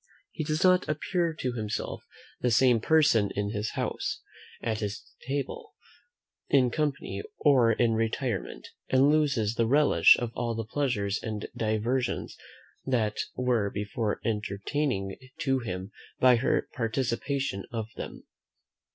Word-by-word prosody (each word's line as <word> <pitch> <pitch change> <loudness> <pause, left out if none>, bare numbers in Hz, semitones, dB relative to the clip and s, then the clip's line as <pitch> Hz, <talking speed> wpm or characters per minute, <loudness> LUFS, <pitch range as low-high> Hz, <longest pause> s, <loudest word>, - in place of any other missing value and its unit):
He - - -4
does 155 +2 -1
not 185 -2 +4
appear 170 +3 0
to 130 -5 -2
himself 110 -3 -4 0.4
the 125 - +1
same 120 0 +4
person 145 -7 +4
in 100 0 -1
his 105 0 -3
house, - - -3 0.4
at 110 -2 -2
his 105 -1 -4 0.2
table, 140 0 -4 0.7
in 130 -3 +4
company, 150 +1 -2 0.2
or 130 -6 +5
in 115 +1 +2
retirement; 115 -1 -2 0.2
and 135 +2 +5
loses 140 -9 +2
the 115 -1 +1
relish 140 - +6
of 120 -2 -3
all 120 -1 -2
the 115 -1 -3
pleasures 110 -5 -1
and 110 -2 -4
diversions 115 +3 -1 0.5
that 115 -5 0 0.2
were 120 -5 +1
before 105 +2 -2
entertaining 105 0 -2 0.2
to 135 -2 +2
him 95 -4 -5 0.3
by 125 -1 +6
her 120 - +1
participation 125 -1 -1
of 115 -2 -3
them. - - -7
120 Hz, 130 wpm, -28 LUFS, 105-135 Hz, 0.7 s, relish